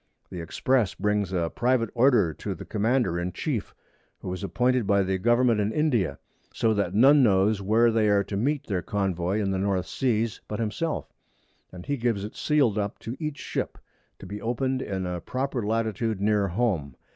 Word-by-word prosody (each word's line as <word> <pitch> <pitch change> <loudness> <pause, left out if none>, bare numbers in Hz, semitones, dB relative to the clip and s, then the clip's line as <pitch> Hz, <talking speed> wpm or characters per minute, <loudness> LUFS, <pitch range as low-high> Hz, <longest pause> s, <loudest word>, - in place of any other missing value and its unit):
The 90 - -5
Express 115 +6 0
brings 105 -2 0
a 85 -3 -1
private 120 -2 +1
Order 120 - +4
to - - -5
the - - -9
Commander 110 -4 0
in 90 +1 -3
chief, - - -3 0.5
who 90 - -4
is 95 - -6
appointed 125 +2 +1
by 100 -1 +3
the 95 0 -1
Government 120 +1 +3
in 105 +1 0
India; 120 - +1 0.3
so 110 -1 +1
that 100 -1 -1
none 140 +6 +6
knows 100 -2 +3
where 115 +4 +3
they 110 -1 +2
are 100 -1 +3
to 100 - -6
meet 140 +7 0
their 95 -4 -1
Convoy 95 -1 -1
in 100 -2 0
the 95 - -1
North 95 -2 0
Seas, 115 -4 -1
but 105 - -4
himself; 150 +9 -3 0.6
and 90 -1 -10
he 145 - -1
gives 115 -5 0
it 105 - -7
sealed 135 -9 +2
up 100 -1 -3
to 115 - -6
each 155 -3 -4
Ship, - - -4 0.4
to - - -11
be 100 +2 -7
open'd 130 +3 -1
in 95 -5 -3
a 90 -1 -4
proper 130 -2 -3
Latitude 110 0 -1
near 105 0 +2
home. 90 - -1
105 Hz, 190 wpm, -26 LUFS, 95-120 Hz, 0.6 s, none